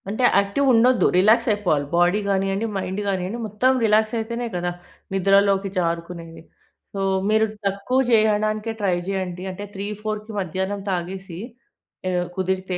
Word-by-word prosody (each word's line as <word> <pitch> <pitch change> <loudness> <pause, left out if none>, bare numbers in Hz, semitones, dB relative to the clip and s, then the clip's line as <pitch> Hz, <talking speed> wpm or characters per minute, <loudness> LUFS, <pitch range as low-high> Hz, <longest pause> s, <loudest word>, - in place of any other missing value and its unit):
అంటే 220 +5 -2
యాక్టివ్ 200 +8 +1
ఉండొద్దు 240 +2 +4
రిలాక్స్ 215 +7 +4
అయిపోవాలి. 175 -9 +1
బాడీ 175 +4 +3
గానియ్యండి 195 +2 0
మైండ్ 190 +1 -3
గానియ్యండి 190 +3 -2
మొత్తం 215 +5 +2
రిలాక్సయితేనే 225 +2 +1
కదా! 175 0 -1 0.4
నిద్రలోకి 195 +1 +3
జారుకునేది. 170 -1 -3 0.5
సో 195 - -3 0.3
మీరు 220 +1 +4 0.2
తక్కువ 200 +6 0
చేయడానికే 215 0 +2
ట్రై 195 -4 +1
జేయండి 185 -2 -3
అంటే 200 +2 -7
3,4 210 +2 -4
మధ్యాహ్నం 190 +2 -3
తాగేసి 185 0 -4 0.7
ఆహ్, 180 -1 0
కుదిరితే 185 0 -1
195 Hz, 120 wpm, -23 LUFS, 185-215 Hz, 0.7 s, ఉండొద్దు